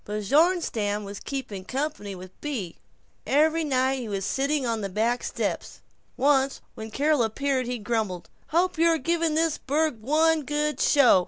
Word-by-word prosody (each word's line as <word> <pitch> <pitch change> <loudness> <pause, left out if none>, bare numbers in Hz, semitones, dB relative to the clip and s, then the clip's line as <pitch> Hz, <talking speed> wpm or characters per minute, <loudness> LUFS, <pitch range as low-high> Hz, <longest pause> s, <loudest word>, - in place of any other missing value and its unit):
Bjornstam 215 - +1
was 200 0 -7
"keeping 255 -9 -5
company" 260 -4 -3
with 185 0 -10
Bea. 235 - -4 0.5
Every 315 +3 +3
night 265 -2 +1
he 235 -3 -5
was 195 -2 -2
sitting 275 +3 0
on 230 -2 -1
the 200 - -3
back 230 +5 0
steps. - - -3 0.4
Once 275 0 +2
when 220 0 -7
Carol 290 +4 +2
appeared 255 +3 0
he 250 0 -2
grumbled, 210 -5 -2 0.2
"Hope 345 +1 +1
you're 330 0 +4
going 260 - -12
to 335 +1 +1
give 305 - -1
this 325 -1 +1
burg 295 -4 0
one 315 +5 +3
good 295 +2 -1
show. 275 -9 +6
270 Hz, 165 wpm, -26 LUFS, 215-305 Hz, 0.5 s, show